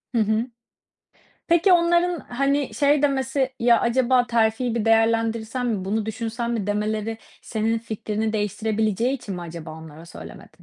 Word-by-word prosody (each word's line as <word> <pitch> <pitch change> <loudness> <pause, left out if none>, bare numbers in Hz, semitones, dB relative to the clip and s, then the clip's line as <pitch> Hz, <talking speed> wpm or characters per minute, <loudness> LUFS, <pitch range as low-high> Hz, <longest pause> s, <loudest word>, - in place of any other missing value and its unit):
Hı - - +3
hı. 220 +3 +1 1.0
Peki, 345 +3 +4
onların 345 -1 +3
hani, 275 -1 -1
şey 285 +4 +3
demesi, 265 -1 0
"Ya 235 0 +4
acaba 250 +1 +2
terfi 230 +1 +1
bir 230 -2 -1
değerlendirsen 225 +2 +1
mi, 210 -6 -1
bunu 215 +2 -1
düşünsen 230 +2 -3
mi?" 225 -4 -2
demeleri 215 +2 -2 0.2
senin 225 0 -1
fikrini 220 -1 -3
değiştirebileceği 215 +2 0
için 210 -7 -6
mi 175 - -6
acaba 165 -1 -8
onlara 160 +1 -11
söylemedin? 170 - -11
225 Hz, 140 wpm, -23 LUFS, 215-255 Hz, 1.0 s, Peki